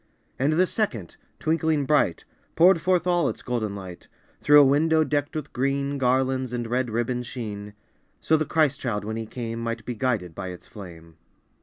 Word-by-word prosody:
And 140 +4 +2
the 180 +4 +4
second, 135 - -2 0.2
twinkling 160 -2 0
bright, 145 - +1 0.3
Poured 175 0 +5
forth 180 0 +2
all 175 -3 +2
its - - -7
golden 110 -5 -2
light 95 -3 -9 0.3
Through 145 0 +7
a 145 - +7
window 155 +4 +3
decked 145 0 -2
with 150 -2 -5
green 140 +2 -1
Garlands 130 0 +1
and 120 -1 -2
red 125 +2 -1
ribbons' 120 +2 -2
sheen, 105 -4 -7 0.4
So 160 - +2
the 155 - +1
Christ 155 -3 +1
child 105 -5 -3
when 110 +1 -4
He 115 -1 -5
came 115 -1 -5
Might 115 -1 -4
be 125 - -3
guided 110 -8 -1
by 95 - -6
its 90 -1 -9
flame. 85 -5 -12
130 Hz, 180 wpm, -25 LUFS, 110-150 Hz, 0.4 s, Through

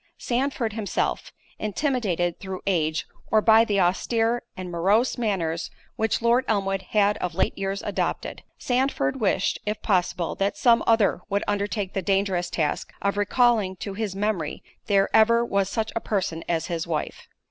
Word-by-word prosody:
Sandford 245 -3 -1
himself, 215 -2 -2 0.3
intimidated 210 - -1
through 190 -1 -6
age, 160 -4 0 0.2
or 220 - +4
by 220 +1 +6
the 205 -3 0
austere, 225 +6 +1 0.2
and 185 -1 -6
morose 200 +9 +2
manners 180 -8 -1 0.3
which 220 +1 0
Lord 240 +2 +4
Elmwood 195 -2 0
had 205 -1 +3
of 175 -2 -4
late 190 - +1
years 195 0 -3
adopted; - - -2 0.2
Sandford 250 - 0
wished, 195 -2 +1
if 210 0 -2
possible, 180 -3 0
that 195 +1 -1
some 235 -2 +4
other 225 -3 +3
would 200 +1 0
undertake 205 -1 -2
the 195 - -1
dangerous 190 -2 0
task 155 -3 -2
of 200 0 0
recalling 205 -1 +2
to 195 +2 -6
his 205 -2 -3
memory 195 -6 -2 0.2
there 200 -1 +3
ever 230 +2 +5
was 200 -4 0
such 220 +1 -2
a - - +1
person 180 -6 -2
as 165 -1 0
his 170 -1 -3
wife. 155 -3 -4
200 Hz, 160 wpm, -25 LUFS, 185-225 Hz, 0.3 s, by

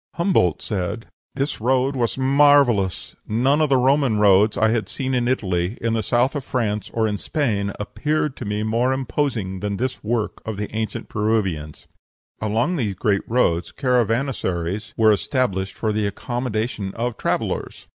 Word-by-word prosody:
Humboldt 170 - +2
said, 105 +3 -3 0.3
"This 140 -3 -2
road 130 +3 +2
was 120 -2 -1
marvellous; 135 -7 +3
none 130 +7 +2
of 155 - +2
the 135 - +4
Roman 130 -2 +3
roads 105 +1 +4
I 110 0 +3
had 115 -1 -1
seen 130 -1 -3
in 120 -1 +1
Italy, 95 -5 -1
in 115 0 -1
the 115 - +1
south 120 +5 +1
of 145 - -2
France, 110 -5 -2
or 110 -1 +1
in 105 -2 -2
Spain, 105 -10 -1
appeared 150 +6 -1
to 120 - -6
me 105 +1 -2
more 115 +4 +1
imposing 120 -7 -2
than 100 +1 -3
this 130 +3 -3
work 110 0 -2
of 110 -2 -5
the 105 +1 -5
ancient 110 -2 -3
Peruvians." 100 -8 -1 0.6
Along 115 - 0
these 105 -8 -1
great 100 +1 +1
roads 90 -8 +1
caravansaries 115 - -1
were 110 -1 +5
established 100 -4 0
for 110 - -1
the 105 -1 0
accommodation 110 -2 -3
of 120 0 -2
travellers. - - -3
110 Hz, 160 wpm, -22 LUFS, 105-130 Hz, 0.6 s, were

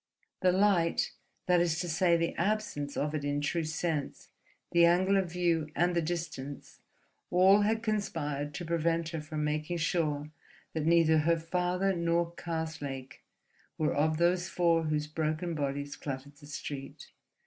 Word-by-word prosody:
The 185 - +4
light, 185 -3 +2 0.3
that 180 -1 +4
is 165 -2 +1
to 175 - -3
say 170 +1 +3
the 165 0 -1
absence 185 -7 -2
of 150 +1 -1
it 150 -2 -2
in 145 0 0
true 160 +3 -1
sense, 155 -2 -3 0.4
the 170 0 +5
angle 180 +3 +4
of 190 -3 +1
view, 170 -3 +1
and 175 +1 +2
the 170 - +3
distance, 155 -4 -5 0.5
all 190 +3 +6
had 220 +2 +1
conspired 150 -9 -2
to 175 - -5
prevent 165 0 0
her 160 -2 -4
from 150 0 -4
making 155 +3 -1
sure 155 -3 -1 0.4
that 155 -1 -1
neither 165 -2 +5
her 165 +2 +3
father 180 +3 0
nor 170 0 +1
Karslake 160 -6 -5 0.6
were 155 - +1
of 155 +2 +1
those 175 +1 +2
four 170 -2 +2
whose 150 -1 0
broken 155 +2 -2
bodies 145 -1 -3
cluttered 140 0 -6
the 145 - -14
street. 140 -1 -7
165 Hz, 155 wpm, -30 LUFS, 150-175 Hz, 0.6 s, all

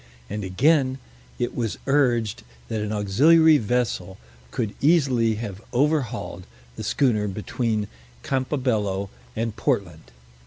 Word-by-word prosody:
And, 105 0 -3
again, 130 - +2 0.4
it 120 - -2
was 115 -4 -2
urged 125 -6 +2 0.3
that 110 - -2
an 105 0 -3
auxiliary 150 +10 +5
vessel 105 -5 -1 0.3
could 110 - -3
easily 135 -8 +3
have 105 -3 -6
overhauled 125 - 0 0.3
the - - -6
schooner 110 -7 +1
between 105 +2 -2 0.4
Campabello 120 -8 -1 0.2
and 115 -1 -2
Portland. 100 - -2
115 Hz, 110 wpm, -24 LUFS, 105-135 Hz, 0.4 s, auxiliary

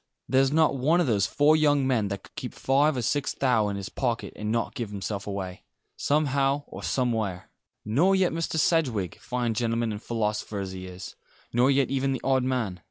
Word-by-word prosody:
There's 135 +1 +3
not 160 -1 +3
one 150 +7 +2
of 175 - +3
those 105 -6 +2
four 150 +2 +4
young 145 -3 +3
men 120 -6 +1
that 100 -1 -5
could - - -17
keep - - -6
five 140 +2 +2
or 125 - -1
six 145 +4 0
thou' 125 -6 +2
in 100 - -3
his 100 -1 -5
pocket 120 -3 -2
and 105 0 -3
not 115 0 -1
give 115 -4 -4
himself 100 0 -5
away 95 -2 -5 0.3
somehow 140 -1 +1
or - - -9
somewhere. 110 -8 -1 0.3
Nor 155 - +3
yet 185 -3 +2
Mr. 165 -1 -2
Sedgewick, 135 - +1
fine 120 -1 -2
gentleman 115 0 0
and 105 0 -5
philosopher 105 -3 -2
as 95 -1 -4
he 95 0 -7
is 90 0 -9 0.4
nor 125 +3 +4
yet 140 -1 +2
even 135 0 +1
the 130 - -4
odd 135 -1 +2
man. 120 -8 -1
125 Hz, 200 wpm, -26 LUFS, 105-140 Hz, 0.4 s, four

